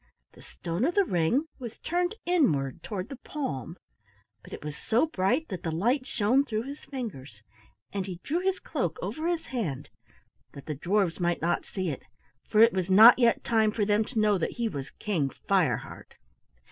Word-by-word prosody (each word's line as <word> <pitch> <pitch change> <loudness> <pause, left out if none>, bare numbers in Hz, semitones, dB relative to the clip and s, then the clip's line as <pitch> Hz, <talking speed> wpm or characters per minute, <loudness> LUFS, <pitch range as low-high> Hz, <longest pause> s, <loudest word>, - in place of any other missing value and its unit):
The - - -17
stone 170 +5 -4
of 335 +6 +1
the 400 -1 +4
ring 180 - +1
was 240 -3 -7
turned 350 +4 -1
inward 155 - +1
toward 200 0 -5
the 275 - -7
palm, 145 - -5 0.7
but - - -14
it - - -8
was 150 -1 -5
so 235 - +1
bright 255 +3 0
that 185 -4 -5
the 165 - -3
light 240 - 0
shone 245 +6 +2
through 220 -5 -2
his 280 +3 -8
fingers, 135 - -7 0.5
and 195 -1 -2
he 180 -2 -6
drew 325 +5 -1
his 380 +1 0
cloak - - -3
over 315 +2 -3
his 340 -2 -1
hand 165 - -3 0.6
that 140 - -10
the 155 - -3
dwarfs 180 +4 0
might 175 -1 0
not 175 +1 0
see 185 -3 -3
it, 140 - -4 0.5
for 215 - +4
it 230 +1 +7
was 185 -1 -1
not 220 +6 +9
yet 235 -2 +3
time 220 -2 +2
for 210 -1 0
them 210 +1 +3
to 230 -1 -3
know 210 -2 +3
that - - -2
he 235 -1 -1
was 140 -8 -5
King 165 -10 -2 0.2
Fireheart. - - 0
215 Hz, 190 wpm, -28 LUFS, 170-265 Hz, 0.7 s, not